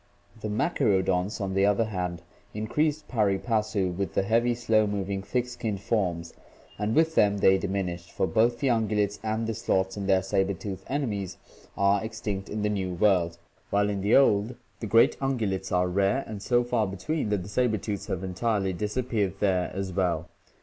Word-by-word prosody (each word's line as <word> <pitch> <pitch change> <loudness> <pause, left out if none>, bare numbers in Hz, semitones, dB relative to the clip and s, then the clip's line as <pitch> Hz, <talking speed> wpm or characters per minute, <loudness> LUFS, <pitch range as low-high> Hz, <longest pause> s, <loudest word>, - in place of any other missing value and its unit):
The 105 - -3
machaerodonts, 100 - +1
on 95 -2 -2
the 95 +1 +3
other 105 +2 +2
hand, 90 -5 -4 0.3
increased 150 +8 -1
pari 105 -5 +1
passu 105 -4 0
with 100 +1 -3
the - - +2
heavy, 115 +4 +2
slow 110 -3 +2
moving, 100 -1 -2
thick 120 +5 -1
skinned 115 -5 -4
forms 90 -6 -1 0.5
and 105 +2 0
with 160 0 +3
them 100 -7 +3
they 95 -1 +4
diminished, 90 -3 -3
for - - 0
both 115 +4 +2
the 140 - -1
ungulates 105 -3 +1
and 110 +1 -1
the 115 - -2
sloths 95 -2 0
and 100 -1 -3
their 95 -1 +4
saber 95 0 0
tooth 95 +1 -6
enemies 110 -10 -2 0.4
are 100 +1 +3
extinct 105 -3 -4
in 105 0 -3
the - - +2
New 95 -3 -2
World, 85 -3 +2 0.3
while 105 0 +2
in 100 -1 -3
the 100 +3 +3
Old 115 -3 +4 0.2
the 110 - -4
great 115 +3 +4
ungulates 105 -8 -1
are 90 0 +2
rare 100 +9 +1
and 105 -2 -7
so 120 +2 +2
far 110 -3 0
between 105 - -2
that 105 -3 0
the - - -9
saber 110 +1 +1
tooths 100 0 -4
have 95 0 -3
entirely 95 +1 -1
disappeared4here 100 -3 -1
as 95 -1 -4
well. 90 -2 0
100 Hz, 180 wpm, -27 LUFS, 95-110 Hz, 0.5 s, they